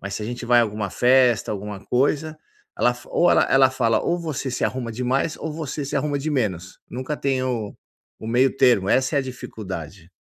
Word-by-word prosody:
mas 100 0 -5
se - - -4
a - - -4
gente 120 +1 -5
vai 120 0 +5
à - - +4
alguma 105 -2 -3
festa, 125 -2 +3
alguma 105 -1 -6
coisa, 150 +6 0 0.4
ela 120 - +3
fa 120 - -15
ou 175 - +3
ela - - +5
ela 135 -1 +5
fala: 120 -3 +1
“Ou 175 - 0
você 155 -5 -4
se 125 - -1
arruma 125 -3 -2
demais 130 +6 -1
ou 160 - -4
você 150 -2 -4
se 135 - -5
arruma 145 -2 -1
de 155 +3 -3
menos, 95 - -2
nunca 130 +4 -4
tem 135 -2 -1
o 115 -5 -3 0.4
o - - -9
meio-termo, 120 -4 +3
essa 130 +4 +2
é - - +5
a 140 - +1
dificuldade.” 95 - -8
125 Hz, 210 wpm, -23 LUFS, 110-135 Hz, 0.4 s, vai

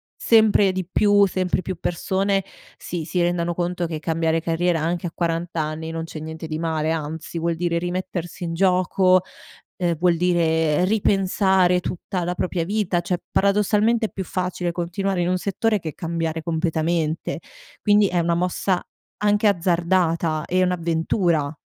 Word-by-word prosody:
sempre 215 -3 +4
di 185 -2 -4
più, 205 0 +4
sempre 185 -1 -1
più 185 - -4
persone 195 +3 0 0.3
si, 170 -3 -5
si 180 - -2
rendano 175 0 0
conto 175 0 -1
che 160 -2 -4
cambiare 165 0 0
carriera 165 +1 0
anche 170 +2 -1
a 165 - -6
40 170 0 -1
anni, 155 +1 -3
non 165 0 -4
c'è 160 - -8
niente 160 +1 -7
di 155 0 -4
male, 160 -1 -1
anzi 160 +1 -4
vuol 170 0 0
dire 170 0 0
rimettersi 175 0 -4
in 165 -1 -3
gioco, 185 +1 +3 0.6
ehm, 170 -3 0
vuol 175 0 +2
dire 165 -2 +2
ripensare 190 -3 +2
tutta 180 +1 -4
la 180 +1 -2
propria 175 -2 -1
vita, 195 -2 0
cioè 175 +1 -1
paradossalmente 210 +3 +2
è - - -19
più 190 - -4
facile 180 -1 -2
continuare 180 +2 -2
in 175 - 0
un 185 - +1
settore 210 +3 0
che 160 -4 -6
cambiare 165 -2 -3
completamente, 160 -1 -1 0.4
quindi 210 -1 +4
è 180 -1 0
una 170 0 +1
mossa 180 +1 0 0.4
anche 210 +1 +3
azzardata 170 -3 +1
e 185 +1 +1
un'avventura. 165 -3 0
175 Hz, 155 wpm, -22 LUFS, 165-185 Hz, 0.6 s, sempre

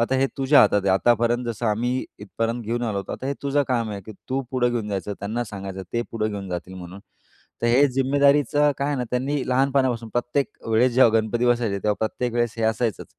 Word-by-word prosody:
आता 120 +3 +1
हे 135 - +3
तुझ्या 135 +2 +5
हातात 105 - +4
आहे. 95 - +2
आतापर्यंत 120 +3 +2
जसं 115 0 -3
आम्ही 120 +4 0
इथपर्यंत 115 +3 -3
घेऊन 120 +3 -2
आलो 105 -3 -2
होतो, 95 - -5
आता 130 - -5
हे 140 - -1
तुझं 140 +1 +1
काम 115 -4 0
आहे, 100 - -5
की 110 - -10 0.2
तू 135 +1 -1
पुढं 125 -2 +1
घेऊन 115 -3 -2
जायचं, 100 0 -3
त्यांना 110 +4 -2
सांगायचं, 95 -3 -7
ते 120 0 0
पुढं 110 -1 -1
घेऊन 100 -2 -6
जातील 90 +1 -5
म्हणून. 90 +1 -9 0.6
तर 120 - +2
हे 135 +5 +5
जिम्मेदारीचं 140 +2 +3
काय 140 +1 -1
आहे 145 - 0
ना, 125 - -1
त्यांनी 135 +3 -1
लहानपणापासून 130 -3 +1
प्रत्येक 120 +4 -1 0.2
वेळेस 115 +3 +3
जेव्हा 120 -3 +6
गणपती 115 +2 -1
बसायचे, 120 -5 +1
तेव्हा 105 -1 +1
प्रत्येक 120 +2 -2
वेळेस 120 -2 0
हे 115 - -2
असायचंच, 110 -1 -1
120 Hz, 215 wpm, -23 LUFS, 105-130 Hz, 0.6 s, जेव्हा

